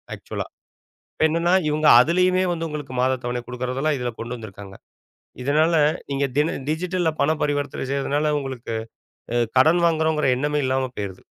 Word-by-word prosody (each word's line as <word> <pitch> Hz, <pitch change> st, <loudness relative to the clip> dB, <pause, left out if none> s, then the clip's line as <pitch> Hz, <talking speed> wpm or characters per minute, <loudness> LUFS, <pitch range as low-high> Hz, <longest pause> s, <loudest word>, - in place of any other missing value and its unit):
ஆக்சுவலா. -, -, -6 dB, 0.7 s
இப்ப -, -, 0 dB
என்னன்னா 170 Hz, +2 st, +1 dB, 0.2 s
இவங்க 150 Hz, 0 st, 0 dB
அதுலயுமே 180 Hz, +6 st, +3 dB
வந்து 165 Hz, -1 st, -3 dB
உங்களுக்கு 145 Hz, -4 st, -6 dB
மாதத் 130 Hz, 0 st, +1 dB
தவணை 120 Hz, 0 st, -2 dB
கொடுக்கிறதுலாம் 130 Hz, +4 st, -2 dB
இதுல 125 Hz, -1 st, -2 dB
கொண்டு 120 Hz, +2 st, -5 dB
வந்துருக்காங்க. 100 Hz, -3 st, -10 dB, 0.7 s
இதனால 155 Hz, +5 st, +2 dB, 0.4 s
நீங்க 140 Hz, 0 st, 0 dB
தின 150 Hz, +2 st, +2 dB
டிஜிட்டல்ல 175 Hz, +1 st, 0 dB
பணம் 155 Hz, +2 st, +1 dB
பரிவர்த்தனை 145 Hz, -2 st, -1 dB
செய்றதுனால 145 Hz, +2 st, 0 dB
உங்களுக்கு, 130 Hz, -4 st, -5 dB, 0.6 s
அ -, -, +1 dB, 0.2 s
கடன் 160 Hz, +6 st, +5 dB
வாங்குறங்குறோம்ன்ற 160 Hz, -4 st, +2 dB
எண்ணமே 150 Hz, +2 st, 0 dB
இல்லாம 130 Hz, 0 st, 0 dB
போயிருது! 100 Hz, -2 st, -6 dB
145 Hz, 145 wpm, -23 LUFS, 125-160 Hz, 0.7 s, கடன்